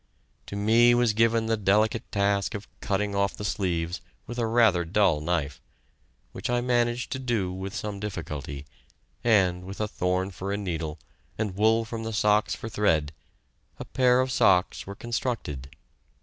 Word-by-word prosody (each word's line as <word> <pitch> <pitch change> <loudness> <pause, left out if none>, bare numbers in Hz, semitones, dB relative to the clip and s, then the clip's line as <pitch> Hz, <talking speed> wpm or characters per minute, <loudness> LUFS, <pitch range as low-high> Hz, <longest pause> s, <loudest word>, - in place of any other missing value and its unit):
To - - -6
me 115 +4 +5
was 120 -3 +3
given 115 +1 +3
the 115 0 +1
delicate 105 +2 +1
task 100 0 +1
of 105 - -7
cutting 100 0 -1
off 100 0 0
the 105 - -5
sleeves 90 -4 -1 0.2
with 120 0 -6
rather 115 -5 +3
a - - -1
dull 90 -4 +2
knife, 75 -4 -2 0.7
which - - -5
I 120 0 +2
managed 120 0 0
to 130 - -2
do 115 -8 -1
with 95 +3 -6
some 105 -3 -4
difficulty, 75 - -5 0.6
and, 95 -6 +3
with 95 +2 -8
a 105 - 0
thorn 90 -1 -1
for 95 +2 -5
a 100 - -1
needle 85 -6 -3 0.4
and 105 -4 -2
wool 110 +2 +3
from 115 0 -5
the 115 0 -4
socks 105 0 +2
for - - -7
thread, 80 -9 +1 0.7
a - - -7
pair 125 -1 +3
of 130 0 -1
socks 90 -6 +3
were 100 - -6
constructed. 115 - -3
105 Hz, 165 wpm, -26 LUFS, 90-115 Hz, 0.7 s, me